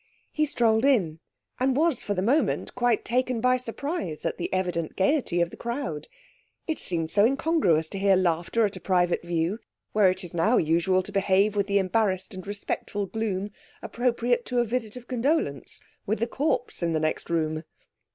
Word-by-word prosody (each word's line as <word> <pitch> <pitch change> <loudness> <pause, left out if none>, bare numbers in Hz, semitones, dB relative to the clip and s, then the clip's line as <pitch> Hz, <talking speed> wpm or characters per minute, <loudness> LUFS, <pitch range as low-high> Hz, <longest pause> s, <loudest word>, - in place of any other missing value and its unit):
He 305 - +1
strolled 225 -4 +2
in, 190 - +2 0.4
and 260 +1 +2
was 320 -4 +2
for 205 - -2
the 185 - -1
moment 280 +9 +1
quite 245 -2 +1
taken 250 0 0
by 250 +2 +3
surprise 250 - -4
at - - -2
the - - -3
evident 180 -3 -1
gaiety 190 - +1
of 170 0 0
the - - -11
crowd. 235 - -4 0.6
It 320 - -2
seemed 165 -3 -1
so 205 - +4
incongruous 255 - +2
to 195 - -5
hear 195 0 +4
laughter 180 +5 +1
at 205 - -3
a - - -7
private 180 -2 +1
view, 170 +4 -1 0.3
where 210 -3 +4
it 185 +1 -2
is 175 - -8
now 210 +9 +3
usual 170 +4 +2
to 205 - -7
behave 195 +1 +2
with 200 -1 +1
the 200 0 +2
embarrassed 190 0 0
and 185 0 -8
respectful 205 0 -3
gloom 205 -1 -3 0.3
appropriate 240 0 0
to 250 - -2
a 240 - +3
visit 225 -1 -3
of 245 -1 -10
condolence 250 - -1 0.3
(with 215 +3 +1
the 230 - 0
corpse 260 -2 -1
in 170 -1 0
the 155 - +1
next 155 0 -2
room). 155 -2 0
205 Hz, 185 wpm, -26 LUFS, 175-245 Hz, 0.6 s, so